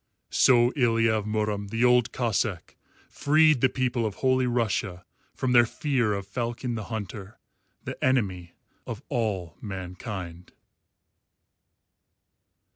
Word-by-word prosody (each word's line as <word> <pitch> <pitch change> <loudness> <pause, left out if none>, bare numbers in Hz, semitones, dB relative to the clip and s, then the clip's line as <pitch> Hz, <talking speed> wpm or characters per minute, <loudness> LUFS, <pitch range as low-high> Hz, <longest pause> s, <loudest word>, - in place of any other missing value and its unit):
So 120 -1 +5
Ilya 115 -4 +2
of 110 -2 -1
Murom 105 -1 -1
the 115 +4 +1
Old 125 -1 +4
Cossáck 110 -6 -2 0.3
freed 155 -2 +3
the 130 - +4
people 125 -2 -1
of 105 -3 -2
Holy 130 -1 +1
Russia 105 -6 -1 0.3
from 130 - -1
their 120 -1 +6
fear 130 -7 0
of 100 -1 -4
Falcon 120 +3 -3
the 110 -3 -4
Hunter, 105 -2 -7 0.5
the - - -7
enemy 95 -10 0 0.3
of 115 +3 -6
all 100 - -2
mankind. 90 -2 -7
115 Hz, 120 wpm, -26 LUFS, 100-125 Hz, 0.5 s, their